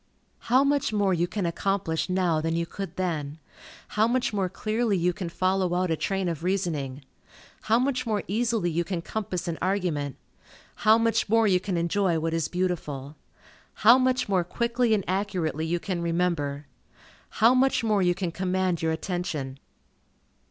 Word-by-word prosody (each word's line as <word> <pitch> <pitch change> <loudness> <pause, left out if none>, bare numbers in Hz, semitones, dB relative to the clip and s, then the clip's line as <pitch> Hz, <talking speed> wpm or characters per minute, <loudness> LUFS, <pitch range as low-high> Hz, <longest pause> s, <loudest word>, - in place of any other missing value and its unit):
How 255 +3 +5
much 280 -4 +1
more 205 -3 +2
you 175 0 +1
can 200 0 -3
accomplish 170 -1 -1
now 180 -4 +1
than 165 +1 -1
you 170 0 0
could 185 0 -7
then! 155 -5 -2 0.5
How 215 +1 +2
much 245 -1 0
more 195 -3 0
clearly 215 +2 0
you 175 +1 +1
can 185 -4 -5
follow 185 0 0
out 180 -1 0
a - - +2
train 190 +3 -1
of 165 -2 -3
reasoning! 155 -8 -2 0.6
How 225 - +5
much 255 -1 0
more 210 -2 0
easily 220 -3 0
you 170 +2 0
can 170 -2 -4
compass 185 -5 -4
an 165 -1 -3
argument! 175 -8 -1 0.6
How 215 +1 +5
much 230 -2 +1
more 225 +1 +4
you 185 -3 +4
can 185 -1 -3
enjoy 170 +1 +1
what 165 +1 -1
is 165 -1 0
beautiful! 155 -6 -3 0.7
How 240 +4 +9
much 255 0 +1
more 190 -3 +2
quickly 235 +5 +1
and 200 - -2
accurately 180 -6 -1
you 175 +1 0
can 180 -1 -3
remember! 165 -4 -1 0.6
How 230 +4 +4
much 260 -1 +2
more 210 -3 +2
you 175 -1 +2
can 180 -2 -2
command 185 -1 -1
your 160 0 +1
attention! 160 -6 -3
185 Hz, 170 wpm, -26 LUFS, 165-210 Hz, 0.7 s, How